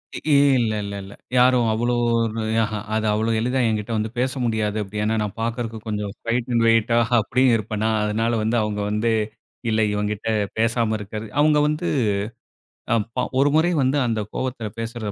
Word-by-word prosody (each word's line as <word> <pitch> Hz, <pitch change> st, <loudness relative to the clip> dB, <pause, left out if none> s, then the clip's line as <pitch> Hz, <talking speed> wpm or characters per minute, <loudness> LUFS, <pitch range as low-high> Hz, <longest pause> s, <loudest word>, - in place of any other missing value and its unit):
இ -, -, -4 dB, 0.4 s
இல்லல்லல்ல, 100 Hz, -4 st, -2 dB, 0.2 s
யாரும் 125 Hz, -2 st, +4 dB
அவ்ளோ 120 Hz, +2 st, 0 dB, 0.2 s
ஒரு 115 Hz, -1 st, -1 dB, 0.2 s
ஆஹா 105 Hz, -1 st, -3 dB, 0.2 s
அது 110 Hz, 0 st, 0 dB
அவ்ளோ 110 Hz, +2 st, 0 dB
எளிதா 125 Hz, +3 st, 0 dB
ஏங்கிட்ட 110 Hz, +1 st, -2 dB
வந்து 110 Hz, +1 st, -1 dB
பேச 130 Hz, +1 st, +1 dB
முடியாது. 110 Hz, -2 st, -1 dB
அப்டி 105 Hz, +1 st, -5 dB
ஏனா, 110 Hz, +1 st, +1 dB
நான் 105 Hz, -, -5 dB
பார்க்கறதுக்கு 115 Hz, -1 st, -3 dB
கொஞ்சம் 105 Hz, -2 st, -3 dB
ஹைட் 120 Hz, +1 st, 0 dB
அண்ட் 115 Hz, -, +3 dB
வெயிட்டா 115 Hz, +1 st, +3 dB, 0.2 s
அப்டி 125 Hz, +4 st, +1 dB
இருப்பேனா, 110 Hz, 0 st, -1 dB
அதனால 110 Hz, +2 st, 0 dB
வந்து 115 Hz, +2 st, +1 dB
அவங்க 105 Hz, -1 st, -2 dB
வந்து 105 Hz, +2 st, +1 dB, 0.6 s
இல்ல 110 Hz, 0 st, +2 dB
இவன்கிட்ட 105 Hz, +1 st, -2 dB, 0.3 s
பேசாம 115 Hz, 0 st, +1 dB
இருக்கிறது 105 Hz, +2 st, -6 dB
அவங்க 150 Hz, 0 st, +4 dB
வந்து 150 Hz, +3 st, -1 dB, 1.0 s
அ -, -, +5 dB, 0.2 s
ப -, -, -11 dB, 0.2 s
ஒரு 145 Hz, +1 st, +4 dB
முறை 165 Hz, +3 st, +3 dB
வந்து 135 Hz, +3 st, +2 dB
அந்த 115 Hz, -2 st, -1 dB
கோபத்தில 125 Hz, -4 st, -3 dB
பேசுறத 115 Hz, -2 st, -4 dB
110 Hz, 165 wpm, -22 LUFS, 105-120 Hz, 1.0 s, அ